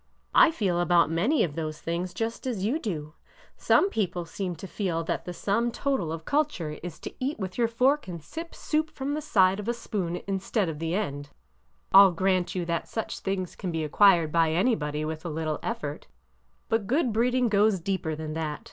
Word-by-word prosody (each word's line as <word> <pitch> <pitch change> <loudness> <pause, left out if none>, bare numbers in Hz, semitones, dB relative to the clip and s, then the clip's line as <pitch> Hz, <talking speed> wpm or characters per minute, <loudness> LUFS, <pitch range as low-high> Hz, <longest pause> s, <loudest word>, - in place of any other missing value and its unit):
I - - +7
feel 195 - 0
about 175 -3 +4
many 215 - +2
of 155 - -2
those 155 -1 -4
things 170 +2 -3
just 225 +6 -3
as 210 -6 -2
you 265 +9 +1
do. 155 - -4 0.4
Some 395 - +3
people 180 -5 -1
seem 180 +1 -4
to 195 - -9
feel 180 -4 -2
that - - -3
the 180 - -4
sum 220 +6 0
total 250 - -1
of 160 0 -6
culture 280 - -1
is 175 -2 -7
to - - -7
eat 270 +4 -2
with 185 -3 -5
your 235 -1 +2
fork 255 +5 +2
and 175 -2 -5
sip 330 - -8
soup 310 0 -1
from 275 0 -4
the 305 - -2
side 195 -9 +3
of 210 - -6
a 235 - 0
spoon 185 -7 -3
in 195 +2 -3
stead 195 -1 0
of 150 -2 -5
the 165 +1 -1
end! 145 -8 -3 0.6
I 195 - +11
'll 195 -3 +6
grant 185 0 +1
that 170 0 -2
such 225 - -4
things 190 -2 -3
can 185 - -4
be 160 -1 -2
ac 150 - -4
quired 175 -6 +5
by 165 -1 +3
anybody 155 -7 0
with 155 0 -4
very 165 -3 -5
little 155 -1 -2
effort. 145 0 -4 0.6
But 225 -3 0
good 255 -1 +1
breeding 245 +2 +2
goes 205 -2 +3
deeper 165 -3 -2
than 155 0 -5
that! 155 -2 -3
185 Hz, 210 wpm, -27 LUFS, 165-225 Hz, 0.6 s, I